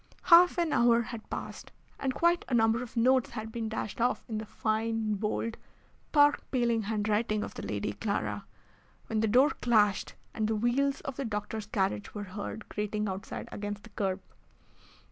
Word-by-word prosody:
Half 350 +1 +7
an 340 -3 +1
hour 235 0 +4
had 230 -1 -8
passed, - - -6 0.3
and 270 - 0
quite 340 +5 +2
a 250 - +2
number 225 +1 +3
of 245 -1 -8
notes 255 +2 +4
had 220 0 -6
been 225 -1 -3
dashed 220 0 -4
off 245 +2 +1
in 220 -3 -3
the 215 - -7
fine, 220 0 -1
bold, 215 +2 -2 0.5
park 290 -1 +5
paling 235 -3 +1
handwriting 215 0 0
of - - -6
the - - -7
Lady - - -3
Clara, - - -2 0.6
when 220 - -1
the 220 - +2
door 255 +7 +5
clashed, 210 -4 +2 0.2
and 215 -1 0
the 220 - 0
wheels 265 +5 +1
of 275 -4 -6
the 275 - -2
doctor's 210 -1 -4
carriage 205 0 -1
were 205 - -3
heard 205 +2 -6
grating 210 0 -2
outside 190 0 -5
against 205 0 -5
the 230 - -14
kerb. 195 -2 -1
225 Hz, 175 wpm, -30 LUFS, 210-245 Hz, 0.6 s, Half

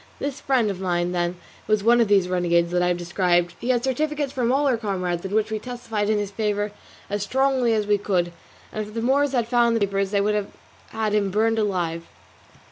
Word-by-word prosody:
This 280 -1 -4
friend 245 -6 +2
of 190 - -7
mine, 175 -2 0
then, 175 0 -1 0.3
was 215 -1 +2
one 240 +2 +5
of 230 - +3
these 195 -3 +3
renegades 170 -1 +1
that 180 0 +1
I 180 - +2
have 180 0 +1
described; 175 0 +1
he 245 - -4
had 245 -2 +2
certificates 290 +2 -1
from 245 -2 0
all 280 +2 +2
our 265 -3 +3
comrades, 185 -6 -2
in 195 +2 -3
which 220 0 +1
we 215 - -1
testified 225 -3 -3
in 215 - +2
his 205 -1 -3
favour 205 0 -1 0.4
as 205 0 -3
strongly 260 +2 +1
as 210 -1 0
we 205 0 +2
could; 180 -4 0 0.4
and 215 -1 -3
if 210 - -12
the 230 - -1
Moors 275 +2 +2
had 240 -3 +1
found 235 -1 +3
the - - +2
papers 195 -1 0
they 200 0 +1
would 210 +1 +1
have 210 -1 -2 0.8
burned 225 +2 +2
him 215 - +2
alive. 170 -3 -3
210 Hz, 220 wpm, -23 LUFS, 185-235 Hz, 0.8 s, one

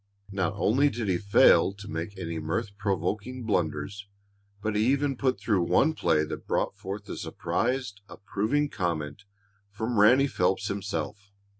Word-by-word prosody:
Not 95 -1 -1
only 130 +8 +3
did 115 -5 -3
he 90 -2 +1
fail 100 0 +5
to 100 +1 -11
make 85 +5 -5
any 85 -3 -4
mirth 100 +7 -3
provoking 100 +6 -2
blunders, 95 0 -2 0.5
but 105 +1 -2
he 105 - +3
even 140 +1 +2
put 130 0 0
through 105 -5 +1
one 140 - +3
play 75 - +2
that 75 - -6
brought - - 0
forth 100 +1 -7
a - - -5
surprised, 125 -3 -2
approving 110 +10 -1
comment 85 - -3 0.4
from 110 +2 -2
Ranny 125 +7 +6
Phelps 95 -5 0
himself. 100 0 -4
100 Hz, 150 wpm, -27 LUFS, 90-115 Hz, 0.5 s, Ranny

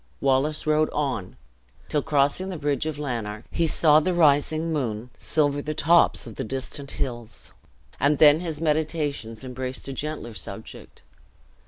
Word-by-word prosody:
Wallace 140 +4 +1
rode 155 0 +3
on 125 -11 -2 0.5
till, 150 - 0
crossing 145 +5 +1
the 185 - -4
bridge 145 +1 -1
of 155 -2 -3
Lanark, 115 -7 -4
he 170 - +1
saw 155 0 +5
the 175 +3 0
rising 155 +1 +3
moon 120 -4 -3
silver 145 -2 0
the 155 +1 -4
tops 165 +3 +4
of 115 -3 -10
the - - -2
distant 135 +3 -4
hills; 120 -3 -5 0.5
and 145 +1 +3
then 150 +1 +7
his 165 -4 -4
meditations 150 -7 -1
embraced 130 +1 -5
a 135 - -4
gentler 150 -4 -5
subject. 105 - -9
145 Hz, 150 wpm, -25 LUFS, 130-155 Hz, 0.5 s, then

